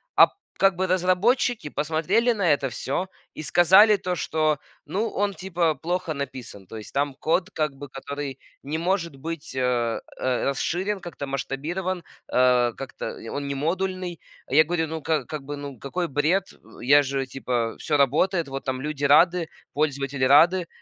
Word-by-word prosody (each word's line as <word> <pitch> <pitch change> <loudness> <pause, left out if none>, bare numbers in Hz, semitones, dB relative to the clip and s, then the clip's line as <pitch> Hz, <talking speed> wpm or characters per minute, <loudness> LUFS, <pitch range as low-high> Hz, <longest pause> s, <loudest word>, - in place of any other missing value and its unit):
А, - - +9
п - - -25 0.3
как 195 -1 +4
бы 190 +2 0
разработчики 185 - +2
посмотрели 165 +12 +1
на 185 -8 +3
это 140 -1 -1
всё 140 +9 -3 0.3
и - - -7
сказали 190 +7 +6
то, 180 -1 -2
что: 155 -2 0 0.3
"Ну, 220 +4 -1
он 200 0 -1
типа 170 -2 0
плохо 170 +3 -2
написан". 130 -9 -7
То 110 - -8
есть 105 - -10
там 140 -1 0
код 180 +5 +1
как 155 -6 -1
бы, 140 +1 -9
который 140 0 -6 0.2
не 150 +3 -3
может 170 -3 -1
быть, 160 0 -6
а, 120 -3 0 0.2
э, 130 -1 0
расширен, 180 +9 -1
как-то 175 -5 -7
масштабирован, 165 +7 -3 0.3
э, 125 -2 +4
как-то, 135 - -7
э, 115 - -6
он 140 0 -4
не 140 - -2
модульный. 180 +3 -2 0.3
А - - -8
я 155 +3 +7
говорю: 160 0 -1
"Ну, 160 0 -5
как 150 -3 0
как 155 -2 -5
бы, 145 +1 -5
ну, 140 -4 -8
какой 170 +5 -3
бред". 155 +8 0
Э, - - -21 0.3
я 145 +4 +6
же, 135 -1 -2
типа, 125 -3 -2
всё 150 - 0
работает. 160 +5 +2
Вот 135 0 -5
там 130 -1 -3
люди 150 -1 -4
рады, 170 +4 +5 0.3
пользователи 140 -2 0
рады. 165 +6 +5
155 Hz, 175 wpm, -25 LUFS, 135-180 Hz, 0.3 s, А